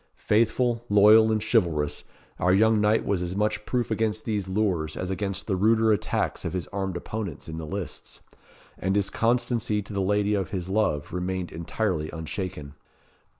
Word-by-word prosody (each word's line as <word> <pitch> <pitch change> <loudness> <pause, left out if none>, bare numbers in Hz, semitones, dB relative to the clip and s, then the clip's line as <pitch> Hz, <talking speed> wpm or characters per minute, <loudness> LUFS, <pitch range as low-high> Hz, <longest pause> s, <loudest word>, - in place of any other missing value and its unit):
Faithful, 115 +2 +1
loyal, 105 +2 +6
and 110 -1 0
chivalrous, 85 -10 0 0.3
our 90 - +3
young 110 +2 +4
knight 105 +1 +2
was 95 -3 0
as 90 +1 -3
much 105 +1 -1
proof 120 -2 -1
against 110 0 -1
these 105 -4 -2
lures, 95 -6 -1
as 90 +1 -3
against 100 -1 -2
the 100 - 0
ruder 110 +3 +3
attacks 105 - -1
of - - -3
his 90 -2 -2
armed 95 -3 -3
opponents 100 -3 -6
in 80 0 -6
the 80 - -6
lists; 95 +1 -6 0.6
and 95 +2 0
his 100 -1 +1
constancy 120 -2 +1
to 100 0 -7
the 100 - 0
lady 105 +2 +1
of 100 -3 -1
his 95 -2 -4
love 95 -9 0
remained 90 0 -3
entirely 85 -1 -2
unshaken. 80 -2 -5
100 Hz, 170 wpm, -26 LUFS, 90-110 Hz, 0.6 s, loyal